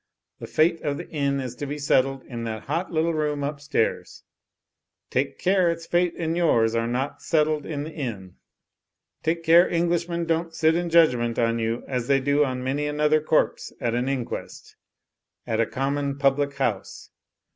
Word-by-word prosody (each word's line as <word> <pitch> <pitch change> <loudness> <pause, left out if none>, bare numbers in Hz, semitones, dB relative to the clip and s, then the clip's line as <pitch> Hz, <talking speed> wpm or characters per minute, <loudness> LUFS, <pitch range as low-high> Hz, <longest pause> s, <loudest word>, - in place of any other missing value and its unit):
The - - -7
fate 165 +1 +2
of 145 -1 -2
the - - -7
Inn 140 -2 0
is 130 -3 -4
to 145 - -4
be 145 +2 -4
settled 135 -2 +1
in 120 -2 -7
that 110 -1 -5
hot 165 +6 -2
little 165 0 +1
room 150 -2 -1
upstairs! 145 -4 -2 0.9
Take 135 +2 -1
care 185 -1 +2
its 165 0 -3
fate 175 0 +1
and 165 -1 -1
yours 115 -10 +3
are 115 0 0
not 130 +4 -3
settled 155 -2 +1
in 145 -3 -3
the 155 - -7
Inn. 105 - -5 0.9
Take 165 +1 -1
care 170 +2 +6
Englishmen 170 0 0
don't 165 0 -1
sit 160 0 +3
in 175 0 -1
judg 165 -5 +5
ment 120 -1 -2
on 115 0 +1
you 115 +1 -2
as 125 -3 -2
they 140 -1 +4
do 145 +2 +2
on 130 -2 -2
many 140 +3 -1
another 150 +1 +2
corpse 155 +1 0
at 115 -1 -1
an 125 +2 0
inquest 130 -4 -5 0.4
— - - -47
^at 110 0 +1
a 115 - +1
common 140 +1 -2
public 140 0 +1
house! 115 -8 -3
145 Hz, 180 wpm, -24 LUFS, 130-165 Hz, 0.9 s, care